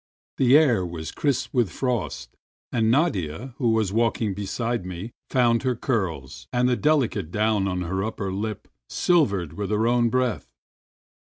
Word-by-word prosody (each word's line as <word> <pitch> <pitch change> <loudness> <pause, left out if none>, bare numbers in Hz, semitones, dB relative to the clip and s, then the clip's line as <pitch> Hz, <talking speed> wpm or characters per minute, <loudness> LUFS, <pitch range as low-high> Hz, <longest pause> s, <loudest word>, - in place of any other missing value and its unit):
The 130 +2 +6
ah* 125 -11 +3
was 85 -2 -5
•^ - - -20
crisp 140 -4 -1
with 120 -7 +2
frost, 110 - -3 0.4
and 110 -2 +1
Nadia, 115 - 0
who 120 -4 +2
was 110 -4 +1
walking 115 -2 +1
be 100 +1 -5
side 115 +1 -2
me, 90 +5 -6 0.2
found 120 -2 +3
her 130 -2 0
curls 85 - -3
and 125 0 +2
the 125 - +2
deHcate 125 - +1
down 105 +1 +1
on 90 -1 -2
her 95 +2 -2
upper 100 -3 -3
lip 105 +1 -4 0.2
silvered 100 - +1
with 100 +3 -4
her 105 +1 +1
own 120 0 +3
breath. 130 0 -1
110 Hz, 165 wpm, -24 LUFS, 95-125 Hz, 0.4 s, The